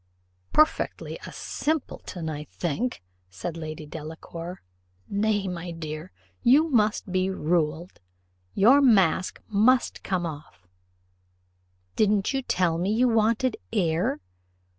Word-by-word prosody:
"Perfectly 310 Hz, +1 st, +1 dB
a -, -, -8 dB
simpleton, 270 Hz, -, -3 dB
I 150 Hz, -1 st, -4 dB
think," 180 Hz, -, -3 dB, 0.3 s
said 100 Hz, -, -5 dB
Lady 155 Hz, -1 st, -6 dB
Delacour. 165 Hz, +3 st, -8 dB, 0.4 s
"Nay, 205 Hz, -1 st, 0 dB
my 180 Hz, -1 st, -5 dB
dear, 160 Hz, 0 st, -6 dB, 0.3 s
you 285 Hz, +7 st, +5 dB
must 210 Hz, -5 st, +2 dB
be 185 Hz, +1 st, +1 dB
ruled; 170 Hz, -1 st, -1 dB, 0.6 s
your 250 Hz, +8 st, +6 dB
mask 195 Hz, -, +3 dB
must 225 Hz, +5 st, +3 dB
come 185 Hz, -3 st, -1 dB
off: 145 Hz, -, -9 dB, 1.3 s
didn't 210 Hz, +1 st, +2 dB
you 270 Hz, -, 0 dB
tell 180 Hz, -8 st, +1 dB
me 185 Hz, +4 st, 0 dB
you 240 Hz, +4 st, +3 dB
wanted 230 Hz, +2 st, +2 dB
air? 170 Hz, -7 st, +1 dB
185 Hz, 110 wpm, -26 LUFS, 160-220 Hz, 1.3 s, your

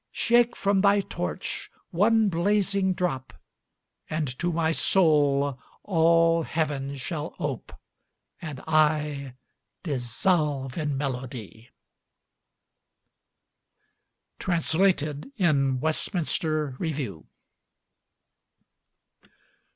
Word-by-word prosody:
Shake 240 Hz, 0 st, +3 dB
from 200 Hz, -1 st, +1 dB
thy 200 Hz, 0 st, +4 dB
torch 90 Hz, -, -5 dB, 0.2 s
one 220 Hz, +4 st, +3 dB
blazing 195 Hz, +1 st, +1 dB
drop, 135 Hz, -9 st, -2 dB, 0.8 s
And 155 Hz, -1 st, -1 dB
to 175 Hz, +1 st, 0 dB
my 165 Hz, -1 st, +1 dB
soul 145 Hz, -6 st, +2 dB, 0.2 s
all 165 Hz, -2 st, +3 dB
heaven 145 Hz, -4 st, -2 dB
shall 150 Hz, +4 st, -5 dB
ope, 145 Hz, -7 st, -4 dB, 0.7 s
And 150 Hz, -5 st, -6 dB
I 150 Hz, -4 st, +1 dB, 0.5 s
dissolve 140 Hz, -, 0 dB
in 150 Hz, -4 st, -2 dB
melody! 125 Hz, -5 st, -5 dB, 2.7 s
Translated 165 Hz, -, +1 dB
in 140 Hz, -, +2 dB
Westminster 155 Hz, -2 st, -1 dB
Review. 135 Hz, -, -4 dB
155 Hz, 75 wpm, -26 LUFS, 140-175 Hz, 2.7 s, thy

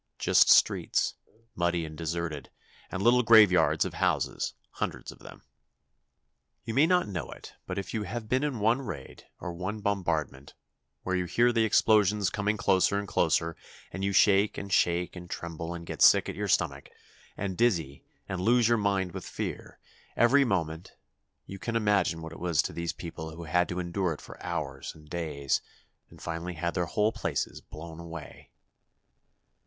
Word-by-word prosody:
Just -, -, +4 dB
streets, -, -, +4 dB, 0.4 s
muddy 85 Hz, -1 st, 0 dB
and 80 Hz, 0 st, -9 dB
deserted, 80 Hz, -3 st, -4 dB, 0.4 s
and 95 Hz, -, -3 dB
little 125 Hz, +1 st, +5 dB
graveyards 110 Hz, -6 st, +5 dB
of -, -, -5 dB
houses, -, -, -1 dB, 0.2 s
hundreds -, -, -4 dB
of -, -, -16 dB
them. -, -, -13 dB, 1.2 s
You 115 Hz, -, -3 dB
may 140 Hz, +6 st, +4 dB
not 180 Hz, -5 st, +2 dB
know 90 Hz, -6 st, -5 dB
it, -, -, -11 dB
but 90 Hz, -, -4 dB
if 100 Hz, -, -5 dB
you 110 Hz, -, -1 dB
have 110 Hz, +3 st, -5 dB
been 130 Hz, +5 st, +1 dB
in 145 Hz, -4 st, -1 dB
one 115 Hz, +6 st, +2 dB
raid, 70 Hz, -, -8 dB
or 90 Hz, -, -5 dB
one 95 Hz, +5 st, -4 dB
bombardment, 80 Hz, -9 st, -2 dB, 0.5 s
where 95 Hz, -, -1 dB
you 90 Hz, -1 st, 0 dB
hear 120 Hz, +7 st, +3 dB
the 115 Hz, -2 st, +2 dB
explosions 105 Hz, -2 st, +3 dB
coming 105 Hz, +1 st, -1 dB
closer 95 Hz, 0 st, +2 dB
and 100 Hz, 0 st, -3 dB
closer, 80 Hz, -2 st, +1 dB, 0.4 s
and 95 Hz, +2 st, -5 dB
you 100 Hz, -, +1 dB
shake 100 Hz, +1 st, +4 dB
and 100 Hz, -2 st, -5 dB
shake 85 Hz, +1 st, +1 dB
and 90 Hz, -1 st, -9 dB
tremble 85 Hz, -1 st, -5 dB
and 85 Hz, 0 st, -8 dB
get -, -, -7 dB
sick -, -, +7 dB
at -, -, -5 dB
your -, -, -3 dB
stomach, -, -, 0 dB, 0.5 s
and 95 Hz, -2 st, -3 dB
dizzy, 85 Hz, -, 0 dB, 0.2 s
and 95 Hz, -2 st, -3 dB
lose 120 Hz, +3 st, +4 dB
your 120 Hz, -1 st, +3 dB
mind 100 Hz, -3 st, 0 dB
with -, -, -7 dB
fear, -, -, -6 dB, 0.4 s
every 135 Hz, +4 st, +5 dB
moment, 85 Hz, -, -2 dB, 0.5 s
you 95 Hz, -, -9 dB
can 115 Hz, +4 st, -4 dB
imagine 105 Hz, -7 st, +1 dB
what 80 Hz, -, -7 dB
it -, -, -11 dB
was 85 Hz, -3 st, +1 dB
to -, -, -5 dB
these 85 Hz, 0 st, -3 dB
people 80 Hz, -2 st, -8 dB
who 85 Hz, -, -8 dB
had 90 Hz, +3 st, +1 dB
to 90 Hz, -, -4 dB
endure 90 Hz, 0 st, -1 dB
it 75 Hz, -, -11 dB
for -, -, -12 dB
hours 80 Hz, -6 st, -4 dB
and 75 Hz, -1 st, -17 dB
days, 75 Hz, -5 st, -1 dB, 0.5 s
and -, -, -15 dB
finally 85 Hz, +2 st, -4 dB
had 85 Hz, +2 st, -2 dB
their 90 Hz, -2 st, -1 dB
whole 105 Hz, +6 st, +1 dB
places -, -, -3 dB
blown 80 Hz, +1 st, -10 dB
away. 85 Hz, -2 st, -10 dB
90 Hz, 175 wpm, -28 LUFS, 85-105 Hz, 1.2 s, sick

